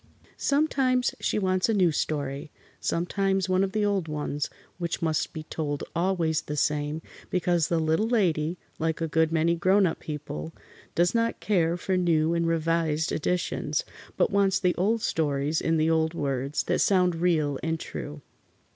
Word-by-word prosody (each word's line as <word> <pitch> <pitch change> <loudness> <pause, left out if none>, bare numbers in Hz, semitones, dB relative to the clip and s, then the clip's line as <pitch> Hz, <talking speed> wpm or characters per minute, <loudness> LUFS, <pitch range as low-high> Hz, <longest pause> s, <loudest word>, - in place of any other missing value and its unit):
Sometimes 270 -4 +1
she - - 0
wants 185 0 +1
a 225 - +2
new 180 -4 +4
story. 145 -2 -2 0.3
Sometimes 190 +2 0
one 185 +1 +2
of 195 - -1
the 215 0 +1
old 195 -5 0
ones, 150 -1 -3 0.3
which 170 -1 -2
must 155 -1 0
be 155 - -6
told 145 -2 -3
always 170 -3 +1
the 150 0 -5
same, 150 +2 0 0.3
because 175 -3 +1
the 170 - +1
Little 160 +7 +1
Lady, 175 -8 +1 0.2
like 160 0 -1
a 165 - -1
good 160 0 +2
many 165 +1 +2
grown 185 +4 +3
up 165 - -1
people, 140 - -6 0.4
does 175 +1 +3
not 230 0 0
care 175 -5 +1
for 185 +1 -1
new 165 -2 +2
and 170 0 +1
revised 165 -1 +1
editions, 180 - -1 0.3
but - - +2
wants 200 -1 +3
the 180 -2 +2
old 215 +5 0
stories 145 0 0
in 165 0 +1
the 160 +1 +2
old 160 0 +1
words, 140 -1 -1
that - - 0
sound 180 -3 +3
real 155 -5 +1
and 160 0 -1
true. 145 -1 -7
165 Hz, 165 wpm, -27 LUFS, 155-185 Hz, 0.4 s, new